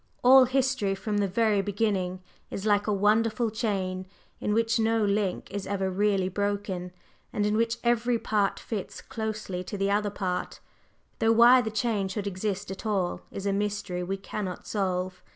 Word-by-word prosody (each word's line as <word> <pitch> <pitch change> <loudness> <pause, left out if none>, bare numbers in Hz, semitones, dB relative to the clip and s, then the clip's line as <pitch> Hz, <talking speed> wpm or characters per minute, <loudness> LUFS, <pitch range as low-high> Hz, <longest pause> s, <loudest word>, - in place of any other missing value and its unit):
All 260 +1 +8
history 255 -6 +1
from 205 +2 -2
the 200 - +2
very 210 +1 +2
beginning 195 -3 -1 0.3
is 195 - -5
like 205 -1 +2
a - - +2
wonderful 215 +3 +2
chain 190 -4 -2 0.3
in 210 - -1
which 225 0 +2
no 225 -1 +2
link 200 -2 -1
is 200 -1 -4
ever 195 -1 -1
really 195 -1 +1
broken, 200 -2 -2 0.4
and 205 - 0
in 210 0 +1
which 230 +1 +1
every 240 0 +2
part 210 -3 0
fits 210 -5 -5
closely 215 -5 -4
to 200 +3 -6
the 195 0 +1
other 205 0 +1
part, 185 -3 -3 0.6
though 225 0 +4
why 240 +3 +7
the 220 - -2
chain 220 -3 0
should 195 +1 -4
exist 200 0 -3
at 190 - -7
all 195 -5 -1
is 195 - -6
a 200 - +1
mystery 205 -3 -2
we 190 +2 -2
cannot 195 -1 -5
solve. 185 -2 -2
205 Hz, 170 wpm, -27 LUFS, 190-220 Hz, 0.6 s, All